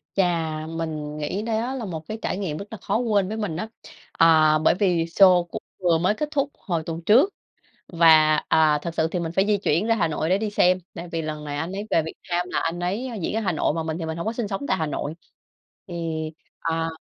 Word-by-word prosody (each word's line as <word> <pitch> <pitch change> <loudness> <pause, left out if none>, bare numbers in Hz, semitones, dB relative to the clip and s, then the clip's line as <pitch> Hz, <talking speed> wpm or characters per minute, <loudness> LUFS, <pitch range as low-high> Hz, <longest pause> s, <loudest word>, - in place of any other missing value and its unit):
Chà, 165 -4 0
mình 155 -2 -4
nghĩ 150 +7 -3
đó 230 +3 -1
là 245 -4 -4
một 160 -5 -6
cái 220 - -4
trải - - -2
nghiệm 170 -7 -3
rất 200 - -6
là 220 - -6
khó 205 +1 -1
quên 215 -5 +1
với 220 +3 -4
mình 200 -7 -3
á. 220 - -3 0.4
Ờ, 155 -2 +5
bởi 160 - +4
vì 180 -4 +1
sô 180 0 +6
cũng - - -5 0.2
vừa 175 -3 +3
mới 180 +5 +2
kết 300 +4 -3
thúc 280 -1 0
hồi 170 -5 -2
tuần 165 0 -4
trước. 260 - +6 0.6
Và, 160 -3 +6
à, 155 -2 +4
thực 170 -1 -4
sự 160 - +1
thì 180 - -2
mình 165 -1 -3
phải 190 +3 +2
di 210 0 +3
chuyển 190 0 0
ra 230 - +3
Hà 175 -7 +1
Nội 155 +1 -2
để 185 +2 +3
đi 215 0 -2
xem, 185 -2 +3 0.2
tại 175 0 -7
vì 165 -1 -1
lần 155 -1 -5
này 145 -1 -4
anh 160 +5 -3
ấy 205 +2 -5
về 165 - +3
Việt 160 - -7 0.2
Nam 175 +1 0
là - - 0
anh 165 +2 -2
ấy 200 +9 -2
diễn - - -2
ở - - +1
Hà 195 -4 0
Nội, 155 - +1
mà 165 - -1
mình 160 0 -3
thì 165 - -4
mình 160 0 -4
hông 170 - -4
có 225 - 0
sinh 230 -3 -3
sống 200 +7 -4
tại - - +2
Hà 160 -3 -1
Nội. 150 +1 -3 0.7
Thì, 175 - -7 0.7
à 165 0 -1
170 Hz, 255 wpm, -24 LUFS, 160-205 Hz, 0.7 s, sô